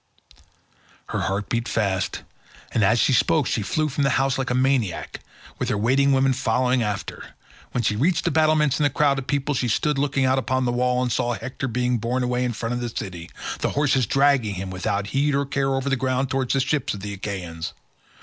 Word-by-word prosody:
Her - - -2
heart 100 +2 -2
beat 120 0 -1
fast, 95 -4 -1 0.5
and 110 - +1
as 110 +4 +4
she 130 - +3
spoke 155 +4 +3
she 115 - -1
flew 155 +10 0
from 140 0 -1
the 135 - +3
house 135 0 +1
like 135 - -1
a 125 - 0
maniac, 130 -8 0 0.4
with - - -1
her - - 0
waiting 135 +6 +3
women 135 0 +3
following 125 +2 +1
after. 105 -2 -4 0.4
When 120 - -1
she 105 -1 +1
reached 155 - +1
the - - +2
battlements 155 -3 +3
and 150 - +3
the - - +4
crowd 140 0 +2
of 130 - -8
people, 145 +1 0
she 125 -2 0
stood 145 +5 +1
looking 140 -1 +1
out 130 +1 +3
upon 130 +1 0
the 120 - +1
wall, 125 +1 +1
and 125 - -1
saw 120 0 0
Hector 130 +2 -5
being 125 0 0
borne 125 +3 -1
away 125 0 0
in 125 -1 -1
front 115 +2 -3
of 120 - -2
the 120 - -2
city—the 90 -6 -5
horses 140 -4 +1
dragging 135 -7 +2
him 95 0 -5
without 95 +2 -2
heed 140 +1 +2
or 140 0 +1
care 135 0 0
over 135 +1 -2
the 135 - +2
ground 130 0 -1
towards 130 0 0
the 135 - +3
ships 135 -2 -1
of 100 - -8
the 100 0 -5
Achaeans. 90 -5 -5
125 Hz, 215 wpm, -23 LUFS, 115-135 Hz, 0.5 s, as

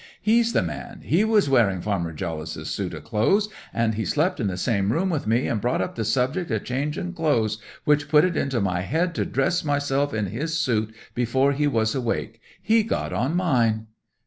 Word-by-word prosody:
"He's 230 +2 +3
the - - +3
man! 235 -1 -6
He 175 +7 +2
was 220 -4 +3
wearing 115 -9 +3
Farmer 85 -4 -2
Jollice's 80 -1 -5
suit 90 -4 -3
o' 75 - -8
clothes, 155 - +1 0.2
and 115 -1 +1
he 110 +1 -2
slept 160 - 0
in 110 - 0
the 90 -2 -2
same 100 0 +1
room 185 +6 +1
wi' 150 -8 -2
me, 115 +4 +2
and 110 - -1
brought 120 +3 0
up 95 - -2
the 115 - -3
subject 130 - 0
of 110 -3 -1
changing 150 +7 -3
clothes, 115 - +1 0.3
which 145 -1 +2
put 150 +2 +6
it 180 -2 -1
into 135 -4 0
my 90 -3 0
head 165 - 0
to - - -1
dress 150 +7 0
myself 145 -1 0
in 110 -3 -1
his 150 - -2
suit 110 -3 0 0.2
before 130 +3 +2
he 145 +1 +1
was 110 -5 +1
awake. 115 -3 -3 0.2
He's 220 +2 +3
got - - -1
on 125 - 0
mine!" 120 -11 +2
125 Hz, 200 wpm, -24 LUFS, 110-155 Hz, 0.3 s, put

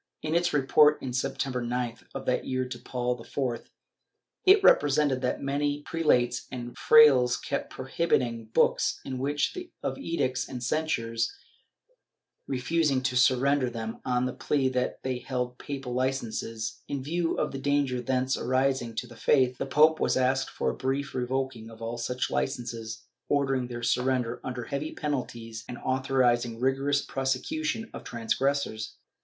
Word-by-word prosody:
In 155 0 -1
its 175 +1 +2
report 150 +1 +5
of 130 -2 -4
September 135 0 -1
9th 120 -1 -3
of 135 - -5
that 125 - +1
year 130 -1 -2
to 125 -1 -7
Paul 125 -1 -2
IV, 125 -3 -3 0.8
it 390 +1 +7
represented 145 - +4
that 125 - -1
many 145 +1 -1
prelates 150 -8 +1
and 120 -1 -6
frailes 130 -5 +6
kept 140 - -3
prohibited 120 -5 -1
books, - - +2
in 130 -1 -4 0.2
spite 360 - -1
of - - -2
edicts 150 - -1
and 125 -2 -6
censures, 120 -6 0 1.2
refusing 135 +1 +1
to 130 -1 0
surrender 130 +1 +3
them 115 -1 -6
on 125 0 +1
the 125 - -2
plea 135 -3 +1
that 125 -1 -2
they 130 -1 -2
held 125 -1 -3
papal 135 -3 -5
licences; 120 -4 -2
in 140 -2 -3
view 165 +3 -1
of - - 0
the 135 - -5
danger 140 -3 +1
thence 130 +1 0
arising 130 -2 0
to 125 - -2
the 120 0 -13
faith, 130 0 +2
the - - -2
pope 155 +3 +5
was - - +2
asked 130 +1 +1
for - - -1
a - - -7
brief 135 +2 -2
revoking 130 -2 -2
all 115 +1 -6
such 125 0 -2
licences, 120 -3 -3 0.3
ordering 135 -3 +1
their 120 -1 -6
surrender 125 -1 0
under 125 -1 -4
heavy 140 +5 -4
penalties 120 -6 -4
and 120 - -6
authorizing 125 -3 +1
rigorous 135 +2 +1
prosecution 225 - -2
of - - -8
transgressors. 120 -1 -1
130 Hz, 150 wpm, -28 LUFS, 125-140 Hz, 1.2 s, it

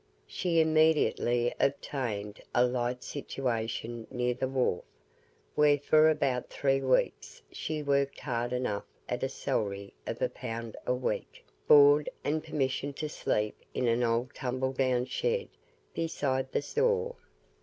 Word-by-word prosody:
She 170 -3 0
immediately 155 -6 +3
obtained 115 -7 -2
a 125 - +5
light 125 0 -1
situation 115 -4 -3
near 125 0 0
the 130 - -2
wharf, 130 -9 0 0.7
where 150 -1 +5
for 155 +2 +5
about 140 -5 0
three 135 -1 +1
weeks 125 - 0
she 155 -1 -3
worked 140 -1 +1
hard 120 -3 -2
enough 125 -5 -2 0.2
at 125 - -2
a 135 - 0
salary 100 -6 -2
of - - -3
a - - +2
pound 115 0 -6
a - - +3
week, 125 - -4 0.2
board, 145 0 +7
and 155 +2 0
permission 140 -2 -1
to 155 +2 -4
sleep 105 -7 -1 0.2
in 125 - +1
an 115 +1 +2
old 120 +2 0
tumbledown 130 0 0
shed 475 - -1 0.4
beside 135 -5 -1
the - - 0
store. 470 - +1
130 Hz, 135 wpm, -30 LUFS, 120-145 Hz, 0.7 s, board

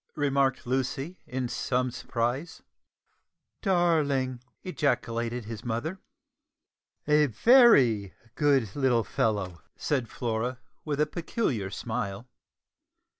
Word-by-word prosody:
remarked 140 -2 +1
Lucy 135 +6 -2
in 130 -1 -2
some 125 +1 -1
surprise. 125 +6 -3 1.0
"Darling!" 150 - +1 0.2
ejaculated 120 - -1
his 110 -2 -7
mother. 130 +11 -3 1.1
"A 150 0 +4
very 125 - +5 0.2
good 135 -9 +2
little 130 -5 +2
fellow," 95 -4 -1
said 130 -6 -1
Flora, 120 +1 -2 0.3
with 145 -2 -3
a 150 - +4
peculiar 150 - -2
smile. 110 0 -4
130 Hz, 90 wpm, -28 LUFS, 115-150 Hz, 1.1 s, very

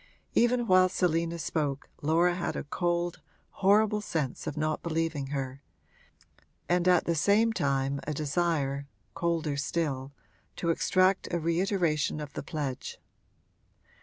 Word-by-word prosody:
Even 240 0 +3
while 185 -3 +5
Selina 170 -2 0
spoke 145 -4 -2
Laura 165 +4 +3
had 175 -1 -3
a - - -3
cold, 175 +2 -1 0.4
horrible 210 +2 +4
sense 155 -10 -3
of 150 - -4
not 155 0 -1
believing 160 -4 -1
her, 135 -1 -4 1.1
and 175 0 +2
at 180 -1 +4
the 170 - +1
same 210 +8 +3
time 140 -5 0
a 155 - -1
desire, 145 -2 0 0.3
colder 165 -4 -1
still, 140 -2 -2 0.4
to 170 - 0
extract 185 +3 +2
a 175 - 0
reiteration 170 -3 0
of 150 -1 -7
the - - -4
pledge. 140 -3 -4
165 Hz, 130 wpm, -29 LUFS, 145-180 Hz, 1.1 s, while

